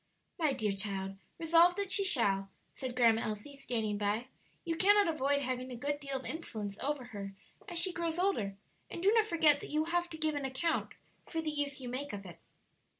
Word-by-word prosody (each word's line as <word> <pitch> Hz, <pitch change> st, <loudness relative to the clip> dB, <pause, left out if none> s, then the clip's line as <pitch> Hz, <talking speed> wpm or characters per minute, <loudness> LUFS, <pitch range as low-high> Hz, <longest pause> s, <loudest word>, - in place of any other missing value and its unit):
"My 310 Hz, -4 st, +2 dB
dear 215 Hz, -5 st, 0 dB
child, 195 Hz, -1 st, -3 dB, 0.2 s
resolve 335 Hz, +2 st, +5 dB
that 400 Hz, -1 st, -2 dB
she 395 Hz, +1 st, +6 dB
shall," 195 Hz, -, +4 dB, 0.2 s
said 255 Hz, -2 st, -5 dB
Grandma 230 Hz, -2 st, +4 dB
Elsie, 215 Hz, +6 st, -5 dB
standing 225 Hz, -6 st, -2 dB
by; 210 Hz, +5 st, -1 dB, 0.4 s
"you 330 Hz, -1 st, -1 dB
cannot 410 Hz, +3 st, +5 dB
avoid 285 Hz, -3 st, +1 dB
having 255 Hz, 0 st, -3 dB
a -, -, -5 dB
good 285 Hz, +4 st, -2 dB
deal 275 Hz, -2 st, -3 dB
of 265 Hz, -, -9 dB
influence 215 Hz, -11 st, -5 dB
over 285 Hz, -1 st, -2 dB
her 195 Hz, -1 st, -6 dB, 0.3 s
as 350 Hz, -, -2 dB
she 365 Hz, +1 st, +3 dB
grows 335 Hz, -1 st, -2 dB
older, 290 Hz, -, 0 dB, 0.3 s
and 340 Hz, -, -6 dB
do 400 Hz, -, +6 dB
not 445 Hz, -1 st, +4 dB
forget 320 Hz, -6 st, +4 dB
that -, -, -8 dB
you 305 Hz, +1 st, +1 dB
will 325 Hz, +2 st, -3 dB
have 350 Hz, 0 st, +1 dB
to 320 Hz, -, -7 dB
give 310 Hz, -1 st, +1 dB
an 290 Hz, -1 st, -3 dB
account 270 Hz, +5 st, -1 dB, 0.3 s
for 325 Hz, -, -3 dB
the 315 Hz, -1 st, -1 dB
use 290 Hz, -2 st, -2 dB
you 255 Hz, -, -6 dB
make 260 Hz, +2 st, -4 dB
of 200 Hz, -1 st, -6 dB
it." 175 Hz, -2 st, -11 dB
280 Hz, 210 wpm, -33 LUFS, 220-330 Hz, 0.4 s, she